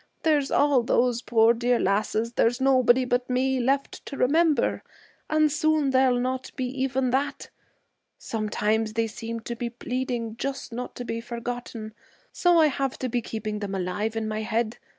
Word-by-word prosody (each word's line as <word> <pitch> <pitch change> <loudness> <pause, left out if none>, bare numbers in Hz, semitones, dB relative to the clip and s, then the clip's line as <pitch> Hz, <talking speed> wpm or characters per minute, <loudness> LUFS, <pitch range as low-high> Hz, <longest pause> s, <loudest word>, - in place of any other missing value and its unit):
There's 295 -4 +2
all 285 -3 +3
those 240 0 +1
poor 230 -1 +4
dear 240 +1 +1
lasses 215 +4 0
there's 240 +1 +2
nobody 260 -1 +4
but 245 0 -1
me 260 +1 +1
left 270 +3 -1
to 275 - -6
remember, 310 +3 +2 0.5
and 310 -1 +3
soon 310 -2 +2
there'll 260 -1 +3
not 255 +1 -2
be 260 - -2 0.2
even 265 -1 0
that. 275 +3 -2 0.7
Sometimes 215 0 -1
they 225 0 +1
seem 230 +1 -6
to 235 +1 -5
be 235 0 -3
pleading 240 -2 -4
just 270 -2 -4
not 250 +2 -5
to 245 - -6
be 230 -1 -3
forgotten, 235 -2 -6 0.4
so 350 -2 +3
I 315 - +6
have 275 -2 -1
to 255 - -3
be 240 +1 0
keeping 215 -1 -4
them 200 -2 -4
alive 195 +4 -2
in 225 -1 -2
my 215 0 -2
head. 225 +1 -1
245 Hz, 170 wpm, -26 LUFS, 225-265 Hz, 0.7 s, I